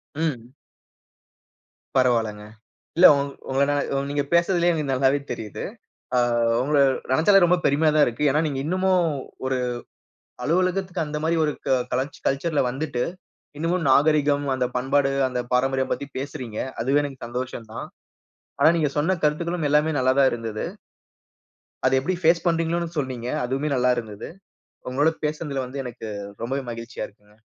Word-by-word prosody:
ம். 140 Hz, -5 st, -3 dB, 1.4 s
பரவால்லங்க. 115 Hz, -5 st, +1 dB, 0.5 s
இல்ல. 180 Hz, -, +9 dB
உங் 140 Hz, 0 st, -2 dB, 0.2 s
உங்கனா 140 Hz, +2 st, +2 dB, 0.2 s
உங்கள 140 Hz, 0 st, -1 dB
நீங்க 145 Hz, -1 st, 0 dB
பேசுறதுலே 175 Hz, 0 st, +3 dB
எனக்கு 150 Hz, -4 st, -2 dB
நல்லாவே 135 Hz, +2 st, +3 dB
தெரியிது. 110 Hz, -4 st, -6 dB, 0.5 s
ஆ, 125 Hz, -, +4 dB, 0.4 s
உங்கள 145 Hz, +2 st, +2 dB, 0.3 s
நினச்சாலே 190 Hz, +8 st, +5 dB
ரொம்ப 180 Hz, +1 st, +3 dB
பெருமையா 150 Hz, +2 st, +3 dB
தான் 150 Hz, -, +6 dB
இருக்கு. 120 Hz, +5 st, -3 dB
ஏனா, 150 Hz, -, +2 dB
நீங்க 135 Hz, -2 st, -3 dB
இன்னமும் 185 Hz, +1 st, +2 dB, 0.4 s
ஒரு 130 Hz, -1 st, 0 dB, 0.9 s
அலுவலகத்துக்கு 180 Hz, +1 st, 0 dB
அந்தமாரி 155 Hz, +2 st, -1 dB
ஒரு 150 Hz, -, +1 dB
க -, -, 0 dB, 0.2 s
கலாச் 130 Hz, +3 st, -2 dB
கல்ச்சர்ல 145 Hz, +2 st, +1 dB
வந்துட்டு, 135 Hz, -2 st, -2 dB, 0.6 s
இன்னமும் 165 Hz, +1 st, 0 dB
நாகரிகம், 145 Hz, 0 st, +3 dB
அந்த 125 Hz, -1 st, 0 dB
பண்பாடு, 135 Hz, +2 st, +2 dB, 0.2 s
அந்த 125 Hz, -1 st, -2 dB
பாரம்பரியம் 130 Hz, +1 st, +1 dB
பத்தி 140 Hz, -, -3 dB
பேசுறீங்க. 130 Hz, -5 st, -6 dB, 0.2 s
அதுவே 140 Hz, +4 st, +3 dB
எனக்கு 135 Hz, -4 st, -6 dB
சந்தோஷம் 120 Hz, -2 st, -5 dB
தான். -, -, -5 dB, 0.7 s
ஆனா, 160 Hz, -, +6 dB
நீங்க 150 Hz, -4 st, +1 dB
சொன்ன 175 Hz, +5 st, +1 dB
கருத்துக்களும் 165 Hz, +1 st, 0 dB
எல்லாமே 150 Hz, +2 st, +3 dB
நல்லா 130 Hz, 0 st, +3 dB
தான் 135 Hz, -1 st, +6 dB
இருந்தது. 115 Hz, -2 st, -4 dB, 1.2 s
அத 130 Hz, 0 st, +4 dB
எப்பிடி 180 Hz, +7 st, -1 dB
ஃபேஸ் 165 Hz, +1 st, +3 dB
பண்றீங்களோன்னு 165 Hz, 0 st, 0 dB
சொன்னீங்க. 130 Hz, -3 st, -4 dB, 0.2 s
அதுவுமே 135 Hz, +4 st, -1 dB
நல்லா 125 Hz, 0 st, +3 dB
இருந்துது. 110 Hz, -2 st, -6 dB, 0.6 s
உங்களோட 145 Hz, +5 st, +2 dB
பேசுனதுல 150 Hz, -3 st, -2 dB
வந்து 135 Hz, +2 st, -5 dB
எனக்கு 120 Hz, -2 st, -7 dB, 0.3 s
ரொம்பவே 135 Hz, +4 st, -2 dB
மகிழ்ச்சியா 115 Hz, -1 st, -6 dB
இருக்குங்க. 105 Hz, 0 st, -25 dB
140 Hz, 140 wpm, -24 LUFS, 125-160 Hz, 1.4 s, இல்ல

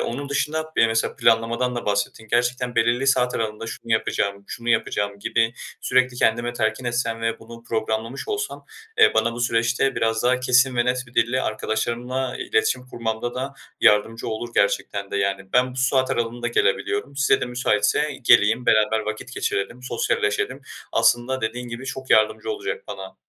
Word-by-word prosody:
onun 140 Hz, +4 st, -3 dB
dışında 155 Hz, +3 st, -2 dB
bir -, -, +5 dB
de 115 Hz, -, +7 dB
mesela 115 Hz, 0 st, 0 dB
planlamadan 115 Hz, +2 st, +2 dB
da -, -, -4 dB
bahsettin 105 Hz, +2 st, -1 dB
gerçekten 120 Hz, +1 st, 0 dB
belirli 120 Hz, +3 st, +2 dB
saat 125 Hz, -2 st, +3 dB
aralığında 110 Hz, 0 st, -3 dB
şunu 115 Hz, 0 st, -5 dB
yapacağım, 100 Hz, -2 st, 0 dB
şunu 120 Hz, 0 st, -7 dB
yapacağım 100 Hz, -3 st, 0 dB
gibi 115 Hz, +2 st, +1 dB, 0.3 s
sürekli 130 Hz, -1 st, +2 dB
kendime 120 Hz, +1 st, +1 dB
telkin 110 Hz, +1 st, -1 dB
etsem 120 Hz, -1 st, -1 dB
ve 115 Hz, 0 st, -1 dB
bunu 115 Hz, +1 st, -12 dB
programlamış 110 Hz, +2 st, -3 dB
olsam, 420 Hz, 0 st, -3 dB, 0.3 s
eee, 440 Hz, -, +6 dB
bana 115 Hz, +1 st, +2 dB
bu 120 Hz, -, -6 dB
süreçte 120 Hz, +3 st, +1 dB
biraz 115 Hz, 0 st, 0 dB
daha 125 Hz, +1 st, +2 dB
kesin 125 Hz, 0 st, +3 dB
ve 120 Hz, -, +3 dB
net 125 Hz, +1 st, 0 dB
bir 115 Hz, -, -19 dB
dille 125 Hz, +3 st, +2 dB
arkadaşlarımla 120 Hz, +4 st, -2 dB
iletişim 125 Hz, +3 st, 0 dB
kurmamda 115 Hz, 0 st, -3 dB
da 135 Hz, +2 st, -4 dB, 0.3 s
yardımcı 110 Hz, +2 st, +3 dB
olur 115 Hz, +2 st, -4 dB
gerçekten 100 Hz, 0 st, 0 dB
de. -, -, -2 dB
Yani 100 Hz, -1 st, -2 dB
ben 125 Hz, 0 st, +3 dB
bu -, -, -12 dB
saat 130 Hz, 0 st, +2 dB
aralığında 120 Hz, +1 st, -1 dB
gelebiliyorum, 140 Hz, -, 0 dB
size 140 Hz, -, +3 dB
de -, -, 0 dB
müsaitse 125 Hz, +4 st, +1 dB
geleyim 110 Hz, +2 st, +4 dB
beraber 110 Hz, 0 st, +4 dB
vakit 110 Hz, +4 st, -5 dB
geçirelim, 100 Hz, +6 st, -2 dB
sosyalleşelim, 125 Hz, +1 st, -1 dB, 0.3 s
aslında 120 Hz, +3 st, +2 dB
dediğin 120 Hz, +2 st, -3 dB
gibi 120 Hz, +3 st, -7 dB
çok 130 Hz, 0 st, -6 dB
yardımcı 110 Hz, -, +3 dB
olacak 425 Hz, +3 st, -4 dB
bana. -, -, -8 dB
120 Hz, 165 wpm, -23 LUFS, 110-130 Hz, 0.3 s, de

